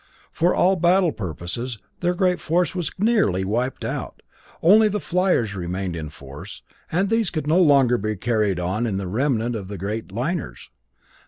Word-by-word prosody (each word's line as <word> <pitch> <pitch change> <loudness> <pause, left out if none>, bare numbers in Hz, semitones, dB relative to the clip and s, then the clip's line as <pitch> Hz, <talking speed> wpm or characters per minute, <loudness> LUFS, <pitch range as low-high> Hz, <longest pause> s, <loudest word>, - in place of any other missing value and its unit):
For 175 +2 +1
all 190 +1 +3
battle 175 0 +3
purposes 110 - -5 0.2
their 175 0 0
great 180 0 +1
force 175 +2 0
was 175 -4 -2
nearly 195 - +2
wiped 120 +6 -2
out, - - -5 0.4
only 215 +6 +7
the 210 0 -1
fliers 180 - +1
remained 90 0 -3
in 80 -2 -5
force; 70 -2 -11 0.3
and 185 +5 +1
these 225 -2 +1
could 155 -4 -3
no 160 +4 +3
longer 135 -7 +4
be 110 +1 -2
carried 105 -2 0
in 95 +4 -1
the 100 - -3
remnant 120 +2 0
of 100 -4 -5
the 100 0 -6
great 105 +3 -4
liners. 125 - -4
120 Hz, 165 wpm, -23 LUFS, -, 0.4 s, only